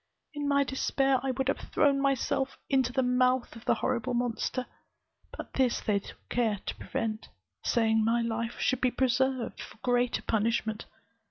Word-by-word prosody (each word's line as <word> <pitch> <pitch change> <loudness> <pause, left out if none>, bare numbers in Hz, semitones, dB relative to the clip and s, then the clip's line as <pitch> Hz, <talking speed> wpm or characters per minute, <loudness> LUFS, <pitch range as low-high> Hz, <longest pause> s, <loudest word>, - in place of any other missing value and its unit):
In 290 -1 -3
my 280 0 +4
despair, 270 0 +1
I 270 - -2
would 265 +1 -1
have 275 - 0
thrown 280 -2 +3
myself 270 0 +1
also - - -22
into 260 -2 +3
the 260 +1 +1
mouth 250 0 +2
of 230 - -12
the - - +3
horrible 255 0 -1
monster, 245 +1 -1 0.7
but - - -8
this 255 -3 +2
they 205 -2 +1
took - - -14
care 225 -4 +1
to - - -2
prevent, 220 -1 -3 0.3
saying 220 -1 +2
my 230 +2 +2
life 230 0 -3
should 260 - +1
be 255 - +4
preserved 260 0 0
for - - -10
greater 245 -1 +1
punishment. 220 0 0
250 Hz, 170 wpm, -29 LUFS, 230-265 Hz, 0.7 s, my